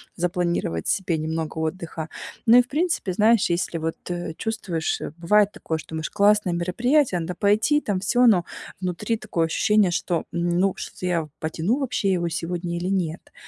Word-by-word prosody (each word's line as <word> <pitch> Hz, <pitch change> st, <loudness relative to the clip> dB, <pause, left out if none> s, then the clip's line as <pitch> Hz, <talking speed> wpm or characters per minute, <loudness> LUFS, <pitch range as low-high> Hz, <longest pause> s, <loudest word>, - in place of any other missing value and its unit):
запланировать 170 Hz, -, -1 dB
себе 180 Hz, -4 st, 0 dB
немного 160 Hz, 0 st, -3 dB
отдыха. 160 Hz, 0 st, -4 dB, 0.4 s
Ну 235 Hz, +1 st, +7 dB
и -, -, +9 dB
в 245 Hz, -, -19 dB
принципе, 320 Hz, -, 0 dB
знаешь, 215 Hz, +2 st, +3 dB
если 170 Hz, 0 st, -1 dB
вот 160 Hz, 0 st, -3 dB, 0.4 s
чувствуешь 195 Hz, -8 st, -2 dB, 0.2 s
бывает 205 Hz, +4 st, +3 dB
такое, 160 Hz, -, -4 dB
что 160 Hz, -, -11 dB
думаешь, 160 Hz, -1 st, -4 dB
классное 205 Hz, -2 st, +3 dB
мероприятие, 215 Hz, -, +1 dB
надо 175 Hz, +2 st, -4 dB
пойти, 215 Hz, -, +3 dB
там 205 Hz, -7 st, -1 dB
всё. 245 Hz, +6 st, +3 dB
Но 180 Hz, -7 st, +4 dB, 0.3 s
внутри 185 Hz, +5 st, -2 dB
такое 175 Hz, -7 st, -1 dB
ощущение, 210 Hz, +3 st, +3 dB
что, 170 Hz, 0 st, -1 dB
ну, 175 Hz, +2 st, +1 dB
что-то -, -, -7 dB
я 170 Hz, -3 st, 0 dB
потяну 165 Hz, -, 0 dB
вообще 235 Hz, -8 st, 0 dB
его 175 Hz, -2 st, 0 dB
сегодня 170 Hz, +1 st, -3 dB
или 175 Hz, +1 st, -3 dB
нет? 180 Hz, -4 st, -2 dB
180 Hz, 160 wpm, -24 LUFS, 170-210 Hz, 0.4 s, и